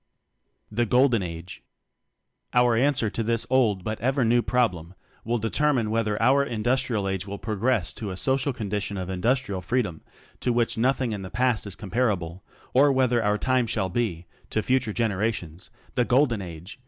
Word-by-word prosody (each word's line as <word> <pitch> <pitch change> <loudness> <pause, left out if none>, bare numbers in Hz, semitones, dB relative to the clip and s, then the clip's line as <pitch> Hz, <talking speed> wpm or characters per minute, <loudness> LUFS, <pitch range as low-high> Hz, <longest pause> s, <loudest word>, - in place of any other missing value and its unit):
The 120 +2 0
Golden 125 -1 +4
Age? 85 +1 -7 0.9
Our 125 -1 +4
answer 130 -1 +2
to 115 - -3
this 115 +1 0
old 110 -8 +2
but 110 +2 -3
ever 130 +1 +1
new 120 +1 +4
problem 105 -8 0 0.3
will 120 +2 0
determine 120 0 +1
whether 110 -2 0
our 140 +2 +4
industrial 120 -3 0
age 95 0 -3
will 100 +1 -5
progress 110 -2 0
to 105 - -5
a 95 - -5
so 130 +6 +2
cial 135 -1 -1
condition 105 -3 -3
of 95 0 -4
individual 100 0 0
freedom 105 -3 -1 0.4
to 125 - 0
which 120 -1 +1
nothing 125 +1 +1
in 105 -2 -4
the 95 - -7
past 115 +1 0
is 100 - -4
compar 110 +4 0
able, 90 0 -7 0.3
or 140 +3 +5
whether 125 -3 +2
our 105 0 +2
time 130 0 +1
shall 105 -4 -1
be, 90 -5 -2 0.2
to 110 - -1
future 130 -3 +1
generations, 100 -6 -2 0.2
the 125 - +2
Golden 120 -3 +2
Age! 85 +5 -9
115 Hz, 175 wpm, -25 LUFS, 100-125 Hz, 0.9 s, or